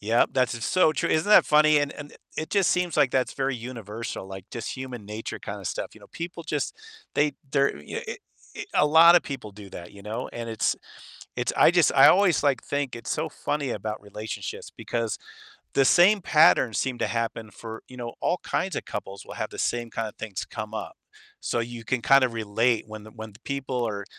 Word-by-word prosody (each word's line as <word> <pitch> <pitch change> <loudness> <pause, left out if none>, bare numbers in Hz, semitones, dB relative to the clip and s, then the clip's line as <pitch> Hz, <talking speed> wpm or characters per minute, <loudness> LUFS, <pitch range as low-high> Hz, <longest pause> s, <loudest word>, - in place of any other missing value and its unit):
Yep, 110 +3 +2
that's 130 -2 +1
s 120 0 -5
so 180 -4 +4
true, - - -1
isn't 160 +6 +1
that 210 - +8
funny, 150 0 +5
and 145 -1 0
and 145 0 -10 0.2
it 155 - -4
just 200 -3 +3
seems 180 -3 0
like 135 -3 +4
that's 130 -1 +1
very 135 -2 -1
universal, 115 -4 -6
like, 95 -1 -8
just 115 +2 -5
human 130 -4 -7
nature 105 +2 -6
kinda - - -7
stuff, - - -3
you - - -16
know? - - -15
People 170 0 -6
just 150 -3 -2 0.4
they 150 0 +2 0.2
they're 140 -1 +3
y 75 - -6 0.5
e - - -4
a 150 - +5
lot 165 +3 +8
of - - +4
people 130 -7 -6
do 100 0 -11
that, 90 +1 -9
you 100 - -13
know? 105 +2 -4
And 115 -1 -5
it's 110 -1 0 0.6
it's - - 0
I - - +7
just - - +4
I - - +9
always, 185 -5 +4
like, 140 -3 +2
think 140 -3 -2
it's 115 - -7
so - - -1
funny 145 -3 -2
about 105 0 -4
relationships 105 +2 -6
because 115 -2 -3 0.6
the 135 - +4
same 190 +8 +6
patterns 155 -9 +4
seem 130 -2 -1
to - - +1
happen 115 -2 -3
for 110 +2 -9
you 130 - -11
know, 120 -1 -5
all 175 - +1
kinds 185 -4 -1
of - - -5
couples 100 -1 -6
will - - -9
have - - -3
the - - -9
same 120 -1 -1
kind 115 - -2
of 105 - -10
things 105 -4 -5
come 110 0 -7
up. - - -5 0.5
So 120 - -1
you 115 0 -5
can 130 0 0
kind 135 +1 +6
of 120 - -4
relate 115 +1 +1
when 110 0 -9
the 110 - -12
when 110 -1 -9
the 100 - -17
people 130 -4 -2
are 100 -2 -4
120 Hz, 220 wpm, -26 LUFS, 110-145 Hz, 0.6 s, I